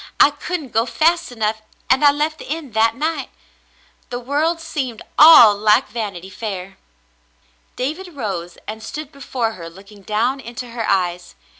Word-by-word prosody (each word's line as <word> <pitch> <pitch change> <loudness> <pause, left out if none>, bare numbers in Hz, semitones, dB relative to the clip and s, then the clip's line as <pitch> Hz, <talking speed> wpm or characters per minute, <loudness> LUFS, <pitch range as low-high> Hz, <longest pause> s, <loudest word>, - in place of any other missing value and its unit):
I 290 - +7
couldn't 295 0 -5
go 225 +2 +1
fast 335 +3 +1
enough, 220 -2 -2 0.3
and 265 +3 +3
I 290 - +8
left 300 +2 -2
the - - -10
inn 310 -5 -4
that 220 +1 +2
night. 315 +5 -2 0.8
The 245 -1 -4
world 295 +7 0
seemed 270 -8 -4 0.2
all 290 -9 +9
like 210 +5 +3
Vanity 195 -5 -5
Fair.^' 195 -3 -6 1.0
David 315 +7 -4
rose 185 -9 -5
and 220 +1 -6
stood 300 +6 -7
before 255 -5 -3
her 170 -5 -9
looking 200 +4 -15
down 225 +7 -1
into 245 0 -8
her 230 -1 -3
eyes. 180 -2 -1
240 Hz, 155 wpm, -20 LUFS, 210-295 Hz, 1.0 s, all